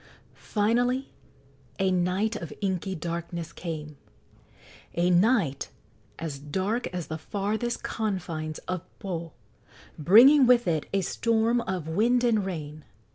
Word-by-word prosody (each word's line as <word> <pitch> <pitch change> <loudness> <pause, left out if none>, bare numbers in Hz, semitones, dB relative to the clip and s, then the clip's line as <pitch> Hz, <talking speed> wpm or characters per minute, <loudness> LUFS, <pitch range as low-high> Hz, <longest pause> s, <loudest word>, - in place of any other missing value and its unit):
Finally 245 +5 0 0.7
a 190 -1 +2
night 185 +5 +1
of 170 -7 -6
inky 190 -1 -2
darkness 170 0 -5
came 155 -4 -6 1.0
a 175 +1 +2
night 180 - +2 0.5
"as 150 -4 -5
dark 190 - -2
as 175 -2 -5
the 160 0 -5
farthest 210 +7 -2
confines 170 -8 -3
of 185 -2 -2 0.2
Po" 170 -4 -5 0.7
bringing 250 - +7
with 240 -3 +5
it 160 -3 0
a 195 - +1
storm 230 +4 +1
of 180 -5 -3
wind 235 +9 +2
and 225 -4 +3
rain. 155 -4 -6
185 Hz, 120 wpm, -27 LUFS, 165-220 Hz, 1.0 s, bringing